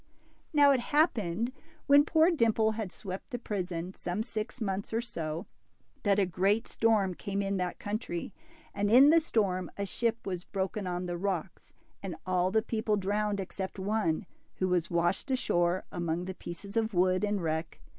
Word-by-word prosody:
'' - - -35
Now 290 -2 +6
it 265 - +3
happened, 235 - +1 0.3
when 285 +1 +6
poor 320 +2 +4
t)imple 225 -7 +2
had 215 -4 -4
swept 190 -1 -7
the 245 - -3
prison 185 -5 -4
some 180 +4 -3
six 220 +1 -5
months 195 -2 -2
or 225 - +1
so, 165 -6 -4 0.6
that 200 -2 +3
a 200 - +4
great 195 +5 +1
storm 215 -5 +2
came 200 +3 -4
in 195 0 0
that 180 -1 -2
country, 205 -5 -4 0.4
and 205 0 0
in 265 +6 +8
the 330 - +7
storm 200 - 0
a 200 - -1
ship 230 +4 -1
was 180 -2 -3
broken 195 +1 -3
on 180 0 -2
the 175 -1 -3
rocks, 190 -2 -3 0.3
and 190 -3 -5
all 185 0 +2
the 220 +3 +2
people 220 -2 0
drowned 205 +1 0
except 190 0 -5
one, 195 -4 0 0.3
who 185 - 0
was 175 -2 +1
washed 175 +8 0
ashore 175 -8 +1
among 170 0 -2
the 190 - -4
pieces 195 +3 -9
of 225 -2 0
wood 185 +2 +3
and 205 -3 0
wreck. 160 +1 -2
200 Hz, 175 wpm, -30 LUFS, 180-220 Hz, 0.6 s, in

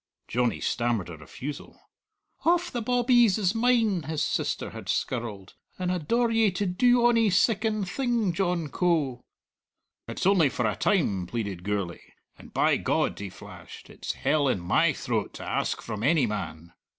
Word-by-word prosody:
Johnny 120 0 0
stammered 120 -7 -1
a 85 - -8
refusal. 135 - -8 0.6
"Hauf 350 +1 +1
the 240 - -3
bawbees 240 -3 +3
is 195 -3 +1
mine," 225 -5 +2
his 155 0 -2
sister - - -2
had - - -9
skirled, 110 -6 -3 0.2
"and 180 -1 -1
I 180 - 0
daur 235 +9 +1
ye 225 -2 +4
to 195 +2 -2
do 240 +6 +3
ony 230 -2 +4
siccan 215 +1 +1
thing, 230 -1 0
John 175 -4 -1
Coe!" 150 -9 0 0.9
"It's - - -4
only 185 -7 +4
for 125 - -2
a 105 -2 0
time," 100 - +1
pleaded 100 -5 -4
Gourlay; 100 -3 -3 0.3
"and, - - -15
by - - +2
God," - - 0
he 100 -1 -5
flashed, - - -12
"it's - - -5
hell 150 -2 +1
in 125 - +1
my 155 - +2
throat 120 -7 -3
to - - -8
ask - - -1
from 110 -2 -5
any 145 +2 +3
man." 85 -6 -5
170 Hz, 160 wpm, -27 LUFS, -, 0.9 s, ye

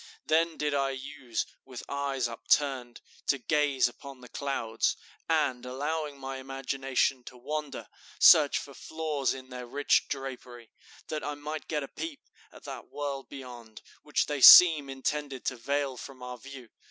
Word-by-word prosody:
Then 165 +1 +2
did 150 -1 -1
I 140 -1 +1
use, 135 -3 -4 0.2
with 125 -2 -9
eyes 140 -2 -1
upturned, 125 +1 0 0.3
to 140 - +2
gaze 140 +1 +2
upon 130 +2 -11
the 125 - -13
clouds, 120 -6 -1 0.3
and, 150 -6 +1
allowing 145 +3 -3
my 135 0 -6
imagination 135 0 -1
to 125 - -11
wander, 150 +3 -5 0.3
search - - +7
for - - -7
flaws 150 -5 -2
in 130 -1 -11
their 125 -1 -7
rich 145 +4 +2
drapery, 125 -4 -7 0.4
that 155 -2 -3
I 145 +1 -3
might 150 +2 -6
get 150 -2 -2
a - - -6
peep 325 - -7 0.3
at - - -15
that - - -8
world 140 -2 -5
beyond, 120 -5 -10 0.2
which 150 - 0
they 145 -2 -3
seem 155 -2 +10
intended 135 0 -3
to 130 - -1
veil 140 +2 -2
from 130 0 -10
our 125 -1 -7
view. 135 -2 -11
135 Hz, 155 wpm, -29 LUFS, 125-145 Hz, 0.4 s, seem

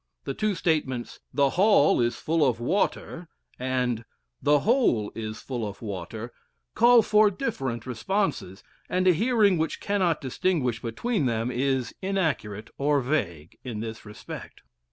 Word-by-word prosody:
The - - -3
two 215 -2 0
statements 145 -8 -1
"the 140 -2 +2
hall 190 - +4
is 120 0 +1
full 160 0 0
of 125 -5 +2
water" 170 +3 -1 0.3
and 125 -2 -1 0.4
"the 145 -1 +4
hole 220 - +2
is 110 -1 -6
full 125 -4 -4
of 105 -2 -5
water" 110 +3 -6 0.4
call 240 0 +6
for 210 0 +5
different 135 - -3
responses, 130 - -2 0.3
and 185 +1 +1
a 180 - +7
hearing 210 -2 +3
which 160 - -1
cannot 185 -6 +1
distinguish 130 -3 -1
between 145 - -1
them 115 +1 -1
is 130 0 0
inaccurate 155 - -2
or 145 +1 +3
vague 85 - -2
in 115 -4 -5
this 115 0 -6
respect. 105 0 -10
135 Hz, 140 wpm, -26 LUFS, 115-185 Hz, 0.4 s, a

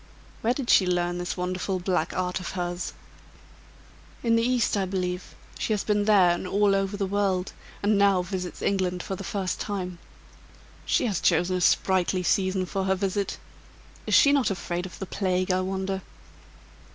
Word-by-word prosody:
"Where 235 +3 +1
did 260 -3 0
she 185 - +5
learn 175 0 0
this 175 +1 -3
wonderful 185 +1 -2
black 180 0 0
art 180 0 -2
of 185 - -6
hers?" 175 -1 -3 1.3
"In 230 -1 +3
the 230 - +3
East, 245 -1 +1
I 195 -2 +1
believe. 180 -1 -3 0.2
She 220 - 0
has 210 - -1
been 205 -1 +1
there 195 -5 +5
and 175 +2 -2
all 200 +1 +3
over 195 +1 0
the 200 - 0
world; 195 -2 0 0.3
and 205 0 +3
now 200 -2 +4
visits 180 -1 -5
England 185 -2 0
for 190 - -4
the 195 - -7
first 190 -1 -2
time." 185 -4 -4 0.9
"She - - +2
has 205 -6 -1
chosen 175 +2 +2
a - - -3
sprightly 185 +1 +2
season 185 +2 +1
for 190 +1 -2
her 190 0 +2
visit. 195 +1 -2 0.7
Is - - +3
she 280 - +7
not 280 -4 +3
afraid 180 -1 -3
of 180 - -12
the 195 - -5
plague, 185 -1 0
I 185 0 +2
wonder?" 190 0 -2
190 Hz, 175 wpm, -26 LUFS, 180-200 Hz, 1.3 s, she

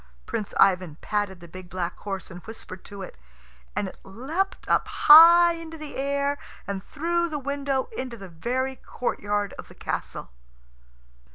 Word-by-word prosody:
Prince 205 - -4
Ivan 180 -5 +4
patted 205 -4 -2
the 170 - -11
big 185 +1 -11
black 180 -1 -3
horse 195 -3 -5
and 175 0 -9
whispered 205 -4 -9
to 200 -1 -8
it, - - -10 0.6
and 200 - -1
it - - -16
leapt 290 - -3
up - - +2
high 340 +3 +9
into 325 -1 -8
the 305 -2 -8
air 280 +1 0 0.3
and 195 -1 -4
through 340 +6 -1
the 305 - -3
window, 280 -1 -1
into 255 - -5
the 195 -2 -9
very 250 +10 -2
courtyard 205 -4 -2
of - - -8
the - - -15
castle. - - -5
235 Hz, 160 wpm, -26 LUFS, 190-285 Hz, 0.6 s, high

